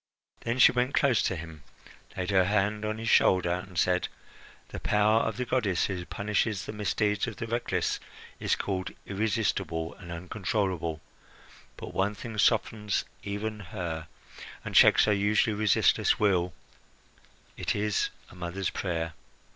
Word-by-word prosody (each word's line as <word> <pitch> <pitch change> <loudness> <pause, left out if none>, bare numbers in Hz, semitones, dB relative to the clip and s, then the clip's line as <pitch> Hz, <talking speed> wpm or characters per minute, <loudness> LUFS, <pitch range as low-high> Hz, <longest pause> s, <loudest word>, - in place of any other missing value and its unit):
Then 115 +2 -2
she - - +8
went 125 +2 0
close 135 -5 +3
to 95 - 0
him, 80 -2 -8 0.6
laid 90 +1 -2
her 95 -2 +4
hand 105 +2 +1
on 110 0 -2
his 115 0 -5
shoulder, 95 -5 +4
and 90 0 -6
said: 90 +2 +2 0.6
"The - - -6
power 105 +2 +3
of 115 -1 -1
the 125 - -1
goddess 110 -8 +1
who 90 -3 -3
punishes 105 0 -1
the - - -5
misdeeds 105 +1 0
of 115 - -5
the - - -4
reckless 120 +1 -1 0.4
is - - +1
called 95 -2 -3 0.2
irresistible 100 -5 -1
and 85 -3 -11
uncontrollable; 90 -2 -2 0.8
but - - -8
one 100 +2 0
thing 115 +2 -7
softens 105 -2 +1 0.2
even 105 +2 -4
her, 85 -4 -5 0.6
and - - -5
checks - - +7
her 105 - +3
usually 105 +2 +2
resistless 105 -1 +3
wheel: 90 -4 +2 1.0
it - - -1
is 105 -1 0 0.2
a - - -14
mother's 90 +2 -3
prayer. 80 -3 -2
100 Hz, 145 wpm, -28 LUFS, 90-110 Hz, 1.0 s, she